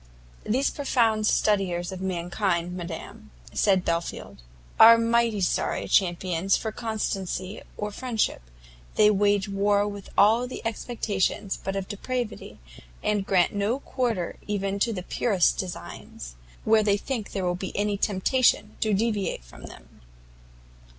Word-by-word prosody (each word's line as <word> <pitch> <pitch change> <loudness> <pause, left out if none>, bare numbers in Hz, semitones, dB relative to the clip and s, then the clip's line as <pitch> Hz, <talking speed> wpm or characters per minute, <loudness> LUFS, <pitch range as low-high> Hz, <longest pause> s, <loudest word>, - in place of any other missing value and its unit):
"These 260 +6 +1
profound 230 -6 +1
studiers 190 -5 +1
of 185 -1 -7
mankind, 180 -1 -1
madam," 170 -2 -8 0.2
said 190 -3 +2
Belfield, 170 - -3 0.4
"are 230 +1 +10
mighty 230 -2 +2
sorry 180 - 0
champions 180 0 +2
for 220 - -4
constancy 205 -4 -3 0.2
or 210 0 -3
friendship. 235 0 -1 0.5
They 210 0 +6
wage 205 -1 +2
war 200 +1 +2
with 200 -1 -7
all 225 +4 +5 0.2
expectations 210 -4 -2
but 195 0 -3
of 195 -1 -3
depravity, 240 +2 -4 0.5
and 205 -2 0
grant 180 -3 +3
no 205 +5 0
quarter 235 -11 -2
even 200 -1 -2
to 230 - +2
the 185 -5 -4
purest 195 -3 +1
designs, 85 - -7 0.3
where 220 0 +4
they 205 -1 +2
think 230 -1 -4
there 195 -2 -2
will 180 - +1
be 180 +1 -6
any 205 0 +1
temptation 210 +2 +1
to 215 -2 +1
deviate 210 - -1
from - - -13
them." - - -14
205 Hz, 130 wpm, -26 LUFS, 185-220 Hz, 0.5 s, are